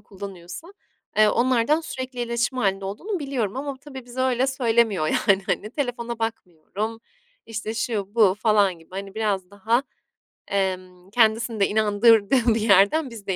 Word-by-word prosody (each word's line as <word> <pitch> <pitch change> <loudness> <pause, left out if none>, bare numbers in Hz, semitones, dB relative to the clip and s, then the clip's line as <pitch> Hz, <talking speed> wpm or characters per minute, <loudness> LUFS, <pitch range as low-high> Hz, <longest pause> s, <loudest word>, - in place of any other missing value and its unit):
kullanıyorsa, 195 - -10 0.4
eee, 215 0 +6
onlardan 255 +6 +2
sürekli 260 -5 -6
iletişim 240 +2 -1
hâlinde 195 -3 0
olduğunu 350 - -4
biliyorum 260 -7 -3
ama 280 0 -4
tabii 265 -2 -10
bize 245 +1 -6
öyle 260 0 +2
söylemiyor. 230 - +1
Yani, 195 +4 +2
hani, 215 - -2
“Telefona 240 -4 -3
bakmıyorum.” 220 0 -5 0.5
işte, 225 0 -5
şu 215 -4 -3
bu 210 -5 +5
falan 205 -4 +2
gibi, 165 - -21
hani, 195 +1 -7
biraz 200 -4 -1
daha, 220 +6 0 0.7
emm, 185 -1 -3
kendisini 225 0 +2
de 195 - +4
inandırdığı 220 +2 +3
bir 225 - -1
yerden 215 +8 +4
bizi 225 -4 -11
de 190 - 0
220 Hz, 150 wpm, -24 LUFS, 200-245 Hz, 0.7 s, eee